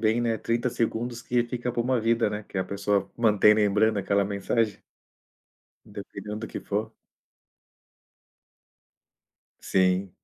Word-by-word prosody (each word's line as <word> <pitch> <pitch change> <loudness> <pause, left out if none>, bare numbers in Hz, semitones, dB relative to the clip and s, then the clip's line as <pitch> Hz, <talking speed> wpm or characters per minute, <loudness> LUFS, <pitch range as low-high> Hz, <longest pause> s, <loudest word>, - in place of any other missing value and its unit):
bem, 110 +1 +2
né, 115 -2 0
30 120 +1 -1
segundos 120 0 -2
que 120 0 +1
fica 120 +1 -3
pra 120 0 -1
uma 125 0 +1
vida, 115 -1 +2
né, 105 +1 -4
que - - -8
é - - +2
a - - -1
pessoa 100 0 -1
manter 105 -2 +5
lembrando 105 0 +2
aquela 100 +1 +1
mensagem. 100 +2 -1 1.1
Dependendo 105 +1 -7
do 110 - -4
que - - -6
for. 110 +2 -3 2.7
Sim, 95 0 +1
110 Hz, 135 wpm, -26 LUFS, 100-115 Hz, 2.7 s, manter